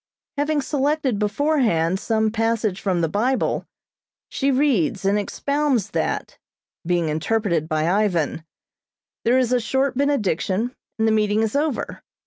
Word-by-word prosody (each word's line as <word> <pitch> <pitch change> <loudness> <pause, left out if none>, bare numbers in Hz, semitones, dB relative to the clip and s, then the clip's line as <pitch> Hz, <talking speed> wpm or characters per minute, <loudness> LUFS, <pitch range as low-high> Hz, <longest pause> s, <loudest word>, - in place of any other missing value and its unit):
Having 295 +1 +1
selected 280 -5 0
beforehand 210 - +1
some 220 0 +1
passage 225 -3 0
from 185 -4 0
the 165 - +2
Bible, 235 +10 0 0.6
she 275 - 0
reads 255 - +1
and 200 +2 +3
expounds 270 -1 -1
that, - - -2 0.4
being 175 -1 0
interpreted 165 0 0
by 155 0 0
Ivan; 175 -5 +1 0.8
there 240 +3 +4
is 255 -1 +2
a 250 - +3
short 265 +3 0
benediction 240 - 0 0.2
and 220 0 +2
the - - +3
meeting 215 0 +2
is 220 +2 -2
over. 295 -2 -1
220 Hz, 130 wpm, -22 LUFS, 190-265 Hz, 0.8 s, there